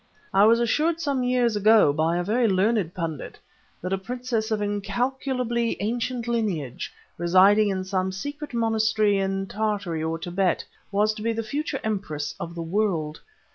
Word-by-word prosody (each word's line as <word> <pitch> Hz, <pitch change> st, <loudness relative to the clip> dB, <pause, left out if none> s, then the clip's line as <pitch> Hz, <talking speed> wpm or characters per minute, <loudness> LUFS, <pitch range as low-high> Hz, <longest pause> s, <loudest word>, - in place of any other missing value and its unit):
I 195 Hz, +2 st, +6 dB
was 230 Hz, +2 st, +5 dB
assured 310 Hz, +8 st, +1 dB
some 285 Hz, -5 st, 0 dB
years 250 Hz, -2 st, +2 dB
ago, 210 Hz, -7 st, +5 dB
by 160 Hz, +3 st, +1 dB
a 175 Hz, -, 0 dB
very 230 Hz, +5 st, +2 dB
learned 195 Hz, -2 st, +1 dB
pundit, 165 Hz, -5 st, -5 dB, 0.5 s
that 185 Hz, +1 st, -2 dB
a 195 Hz, -, 0 dB
princess 240 Hz, +1 st, -3 dB
of 220 Hz, -1 st, 0 dB
incalculably 235 Hz, +4 st, -1 dB
ancient 240 Hz, +2 st, -2 dB
lineage, 195 Hz, -, -2 dB, 0.3 s
residing 190 Hz, +5 st, +5 dB
in 190 Hz, -1 st, -1 dB
some 190 Hz, 0 st, -1 dB
secret 285 Hz, +10 st, -6 dB
monastery 220 Hz, -3 st, +2 dB
in 195 Hz, 0 st, -1 dB
Tartary 200 Hz, -6 st, -2 dB
or 160 Hz, +1 st, -1 dB
Tibet, 180 Hz, +2 st, -1 dB, 0.3 s
was 210 Hz, +2 st, +2 dB
to 215 Hz, -, -9 dB
be 230 Hz, +1 st, 0 dB
the 225 Hz, 0 st, -3 dB
future 280 Hz, +4 st, -3 dB
empress 175 Hz, -9 st, -3 dB
of 170 Hz, 0 st, -6 dB
the 170 Hz, -, -4 dB
world. 165 Hz, -4 st, -1 dB
210 Hz, 160 wpm, -25 LUFS, 185-235 Hz, 0.5 s, I